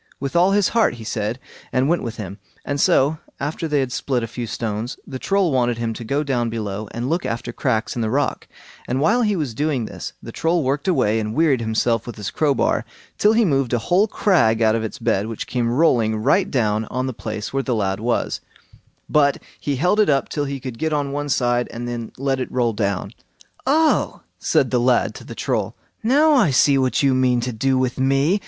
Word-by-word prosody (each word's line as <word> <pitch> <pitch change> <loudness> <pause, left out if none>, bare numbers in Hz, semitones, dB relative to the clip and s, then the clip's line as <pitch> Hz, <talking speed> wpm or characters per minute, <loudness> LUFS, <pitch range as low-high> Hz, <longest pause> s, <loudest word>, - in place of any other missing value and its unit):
With 140 +3 -4
all 175 +2 +5
his 205 -3 +3
heart, 230 - +2
he 115 - -10
said, 110 +1 -2 0.3
and 130 +1 +2
went 170 +3 +2
with 115 -2 -5
him; 100 -2 -7 0.3
and 140 0 -1
so, 150 +4 +3 0.2
after 150 +3 -3
they 150 -2 +1
had 130 -2 -2
split 125 -1 -1
a - - -2
few 120 +1 -5
stones, 110 +2 -3
the 130 - -7
Troll 195 -1 +1
wanted 120 -3 +1
him 115 -1 -2
to 115 - -7
go 140 +6 0
down 125 -5 0
below 105 -2 -4
and 120 +2 -4
look 165 +5 0
after 115 0 -4
cracks 115 -4 -1
in 120 - -2
the 110 - 0
rock; 140 +4 -1 0.4
and 125 +2 -1
while 215 - +3
he 210 -3 +2
was 145 -9 -2
doing 140 -2 -1
this, - - -7
the - - -9
Troll 165 0 0
worked 140 +7 -1
away, 125 - +2
and 110 0 -3
wearied 150 -5 +3
himself 115 +1 0
with 120 - -6
his 100 -4 -5
crowbar 145 +4 +1 0.4
till 210 +1 +5
he 230 0 +4
moved 135 -7 +1
a - - +4
whole 180 - +2
crag 165 - +2
out 110 -1 +4
of 115 0 -1
its 110 +5 -5
bed, 105 -4 0
which 115 -1 -5
came 120 -2 -1
rolling 120 -5 +3
right 140 - +2
down 110 -4 0
on 130 +4 -3
the 130 - -3
place 110 -1 -5
where 135 - +1
the 125 -2 -1
lad 95 -2 -1
was; 115 +2 -1 0.7
but 140 -2 +3 0.2
he 145 - -2
held 180 +10 +2
it 210 - +4
up 135 -2 +2
till 145 -1 -2
he 140 0 -4
could 125 -3 -7
get 160 -1 0
on 145 -2 -1
one 145 +1 -3
side, 120 -2 +1
and 120 +1 -5
then 120 -2 -5
let 135 0 0
it 130 - -4
roll 120 -3 0
on. 100 -2 -2 0.6
"Oh!" 310 +3 +2 0.2
said - - +1
the - - +2
lad - - +2
to - - -10
the - - -9
Troll, - - -2 0.3
"now 290 +7 +4
I 240 - +4
see 135 +1 +4
what 130 +1 +1
you 135 -1 +4
mean 130 -1 +2
to 125 0 -3
do 130 +4 +1
with 130 0 -1
me. 135 +8 +2
130 Hz, 225 wpm, -21 LUFS, 115-150 Hz, 0.7 s, all